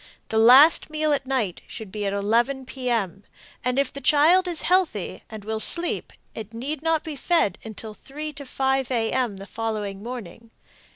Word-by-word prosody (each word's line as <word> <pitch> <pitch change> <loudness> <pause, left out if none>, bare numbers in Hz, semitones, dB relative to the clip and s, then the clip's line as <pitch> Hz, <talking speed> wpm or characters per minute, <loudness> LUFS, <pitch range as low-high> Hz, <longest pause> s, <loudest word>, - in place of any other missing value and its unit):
The 220 - +1
last 260 +10 +7
meal 310 -1 0
at 275 -2 -2
night 235 -10 -1
should 215 -4 -9
be 205 0 -3
at - - -1
11 235 +7 0
p. 255 -1 -5
m., 200 -5 -1 0.4
and 250 +1 -1
if 275 -1 0
the 280 - -7
child 330 +7 +4
is 345 -2 -1
healthy 355 - 0
and 215 -2 -9
will 220 0 -3
sleep 340 +9 +2 0.2
it 220 0 -9
need 275 +5 -4
not 325 -1 +1
be 315 -2 -6
fed 325 - +1
until 220 0 -8
3 300 +8 -8
to 285 0 -9
5 265 0 0
a. 230 -3 0
m. 250 -5 -1
the 195 - -9
following 210 -3 -4
morning. 230 -1 -8
250 Hz, 185 wpm, -24 LUFS, 220-290 Hz, 0.4 s, last